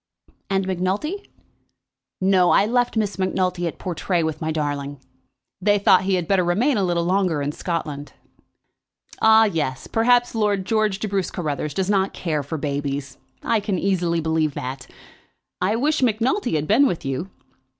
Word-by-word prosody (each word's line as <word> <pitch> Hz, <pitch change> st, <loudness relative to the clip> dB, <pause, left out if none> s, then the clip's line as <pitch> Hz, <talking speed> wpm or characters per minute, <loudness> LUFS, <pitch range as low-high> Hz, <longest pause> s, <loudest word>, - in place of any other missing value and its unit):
"And 195 Hz, -1 st, 0 dB
Macnulty?" 190 Hz, -, -2 dB, 0.9 s
"No. 185 Hz, -1 st, +3 dB
I 200 Hz, -, +4 dB
left 245 Hz, +1 st, 0 dB
Miss 205 Hz, -3 st, -1 dB
Macnulty 185 Hz, -2 st, 0 dB
at 165 Hz, -, -6 dB
Portray 175 Hz, -1 st, -1 dB
with 160 Hz, -1 st, -3 dB
my 160 Hz, 0 st, -1 dB
darling. 145 Hz, -2 st, -3 dB, 0.6 s
They 205 Hz, +2 st, +3 dB
thought 190 Hz, -2 st, +4 dB
he 195 Hz, 0 st, +2 dB
had 175 Hz, -3 st, -2 dB
better 195 Hz, -2 st, +3 dB
remain 220 Hz, +11 st, +2 dB
a 200 Hz, -, +1 dB
little 175 Hz, -2 st, 0 dB
longer 185 Hz, -4 st, +1 dB
in 145 Hz, 0 st, -1 dB
Scotland." 150 Hz, -3 st, -4 dB, 1.1 s
"Ah, 220 Hz, 0 st, +6 dB
yes; 150 Hz, -10 st, -2 dB
perhaps 245 Hz, +2 st, +2 dB
Lord 205 Hz, -4 st, 0 dB
George 215 Hz, -2 st, +1 dB
de 215 Hz, -, -3 dB
Bruce 195 Hz, -2 st, -1 dB
Carruthers 150 Hz, -3 st, -3 dB
does 190 Hz, -1 st, 0 dB
not 195 Hz, -1 st, +1 dB
care 155 Hz, -4 st, -2 dB
for 140 Hz, +3 st, -5 dB
babies. 140 Hz, -2 st, -4 dB, 0.2 s
I 225 Hz, -, +2 dB
can 200 Hz, -2 st, -2 dB
easily 175 Hz, -3 st, 0 dB
believe 160 Hz, -2 st, 0 dB
that. 130 Hz, +1 st, -6 dB, 0.7 s
I 195 Hz, +4 st, +1 dB
wish 295 Hz, +6 st, +1 dB
Macnulty 240 Hz, -, +1 dB
had 155 Hz, 0 st, -1 dB
been 275 Hz, +7 st, +5 dB
with 170 Hz, -, -3 dB
you." 135 Hz, +8 st, -3 dB
185 Hz, 160 wpm, -22 LUFS, 155-210 Hz, 1.1 s, Ah